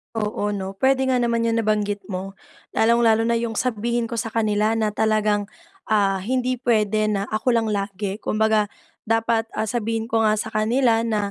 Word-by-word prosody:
Oo 210 -1 -1
'no, 195 -1 -4
puwede 265 +4 +2
nga 255 -1 +2
naman 235 -1 +1
yung 230 0 +1
nabanggit 205 -1 0
mo. 190 +1 -5 0.4
Lalong-lalo 225 -1 +3
na 230 0 +1
yung 230 -1 -3
sabihin 235 0 -1
ko 235 - -3
sa 225 - -1
kanila 215 0 +1
na 220 -1 0
talagang, 210 -1 +1 0.4
ah, 200 -3 +2
hindi 255 +5 -1
puwede 215 -3 +1
na 205 -1 -2
ako 225 +3 +1
lang 225 -1 +1
lagi. 200 0 -3
Kumbaga, 215 -1 +1 0.4
dapat, 225 0 +1
ah, 215 -1 -2
sabihin 225 0 -2
ko 225 -1 +2
nga 215 - +3
sa 215 - -3
kanila 230 +1 +2
na, 210 -3 -1
220 Hz, 175 wpm, -22 LUFS, 210-230 Hz, 0.4 s, Lalong-lalo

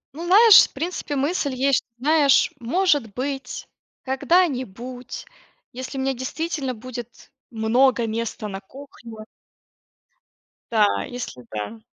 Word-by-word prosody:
Ну 335 +3 -6
знаешь, 415 +4 +8
в - - -27
принципе 325 0 -4
мысль 285 0 -1
есть, 270 0 +2
что, - - -26
знаешь, 290 0 +4
может 280 - +1
быть, 270 +3 -5 0.3
когда-нибудь, 255 - -1 0.5
если 255 +2 -7
у - - -2
меня 270 0 0
действительно 270 +2 -3
будет 240 0 -10 0.2
много 235 +2 +2
места 225 -1 -4
на 195 -1 -6
кухне. 230 -1 -12 1.5
Да, 215 -3 +2
если 245 - -7
да. 110 - -5
260 Hz, 115 wpm, -23 LUFS, 230-285 Hz, 1.5 s, знаешь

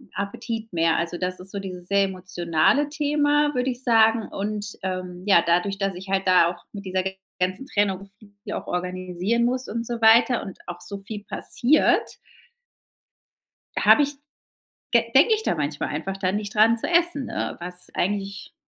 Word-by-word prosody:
Appetit 225 +2 -5
mehr. 165 -1 +2
Also 170 +1 -2
das 185 0 -2
ist 185 +1 -8
so 200 - -4
dieses 180 -2 -7
sehr 200 0 +3
emotionale 185 - +1
Thema, 295 0 +1
würde 250 +1 0
ich 250 +1 -5
sagen. 225 -2 +4
Und, 205 0 -4
ähm, 185 -1 -4
ja, 190 -4 +6
dadurch, 180 +4 +1
dass 195 -1 0
ich 190 +2 -9
halt 195 0 0
da 180 -2 +5
auch 175 0 -9
mit 200 -1 -8
dieser 185 0 -1 0.4
ganzen 185 +8 -1
Trennung 200 -4 -1
viel 205 -1 -10
auch - - -5
organisieren 185 +5 -1
muss 255 +1 -1
und 230 +2 -3
so 235 -1 -4
weiter 230 +2 +5
und 195 - -8
auch 175 0 -7
so 200 +3 -5
viel 205 +1 -8
passiert 280 +6 +1 1.6
habe 295 - +6
ich 290 +1 -1 0.8
de 230 0 +3
denke 315 - +6
ich 435 - -5
da - - 0
manchmal 145 -1 -2
einfach 190 +6 -4
da 185 -1 0
nicht 205 0 -4
dran 225 +2 +5
zu - - -3
essen, 345 -6 +2
äh, - - -3
was 180 +1 -5
eigentlich 200 - -3
200 Hz, 175 wpm, -24 LUFS, 185-235 Hz, 1.6 s, ja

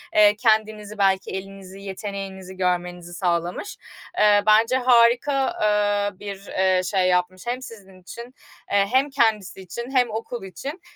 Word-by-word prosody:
Eee, 210 0 +6
kendinizi 215 -1 0
belki 195 -1 +1
elinizi 195 0 -8
yeteneğinizi 195 -1 -7
görmenizi 180 -1 -2
sağlamış. 175 - -2 0.4
Iıı, 205 -1 +5
bence 225 +4 +4
harika, 250 +2 +3
eee, 205 -1 +1
bir, 200 -1 -8
ııı, 185 -1 +3
şey 185 -1 +1
yapmış 180 +3 0
hem 250 +2 -2
sizin 195 -7 -12
için, 210 +6 -9 0.5
eee, 200 0 +3
hem 265 +3 +3
kendisi 215 -7 0
için 235 +8 -7
hem 250 -3 +2
okul 225 0 -5
için 275 - -7
205 Hz, 135 wpm, -23 LUFS, 190-230 Hz, 0.5 s, Eee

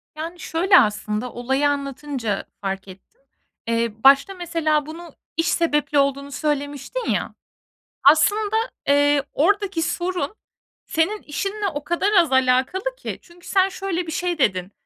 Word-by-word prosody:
Yani 330 +3 -6
şöyle 345 +4 +4
aslında, 215 +1 -1
olayı 265 +4 +1
anlatınca 275 -6 -3 0.2
fark 195 -1 -4
ettim: 195 - -15 0.5
Eee 230 0 0
başta, 275 +7 +6
mesela, 330 -4 0
bunu 325 +1 -10 0.2
iş 330 - +1
sebepli 295 -3 +1
olduğunu 280 0 0
söylemiştin 290 - -3
ya, - - -1 0.7
aslında, 410 +9 +4 0.3
eee, 285 0 +4
oradaki 395 +1 +1
sorun 350 -1 -2 0.5
senin 370 +7 0
işinle 395 +8 -3
o 290 0 -5
kadar 345 +6 0
az 345 -8 +4
alakalı 260 - +1
ki. - - -6
Çünkü 345 0 -19
sen 380 -1 +3
şöyle 375 -2 -3
bir 320 - -5
şey 350 +1 -2
dedin: 185 -7 0
300 Hz, 135 wpm, -22 LUFS, 270-355 Hz, 0.7 s, başta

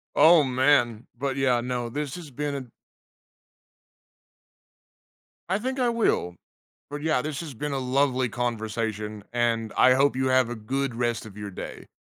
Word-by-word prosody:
Oh, 165 -1 +7
man. 125 -3 +2
But 135 0 -2
yeah, 130 -3 +3
no 120 -1 -3
this 145 +2 -4
has 165 -4 -9
been 140 -1 -4 2.8
I 190 - +1
think 260 +4 -3
I 245 - +3
will. 225 - +1 0.5
But, 145 0 -5
yeah, 155 -5 +1
this 150 +1 -4
has 155 -5 -7
been 145 +5 -4
a 135 - -1
lovely 130 -1 +1
conversation, 110 -2 -3
and 115 -2 0
I 130 0 +6
hope 140 +1 +3
you 130 0 +1
have 130 -2 +3
a - - -3
good 130 +4 -2
rest 120 -1 -1
of 100 - -12
your 105 -1 -6
day. 90 - -8
130 Hz, 155 wpm, -26 LUFS, 115-145 Hz, 2.8 s, Oh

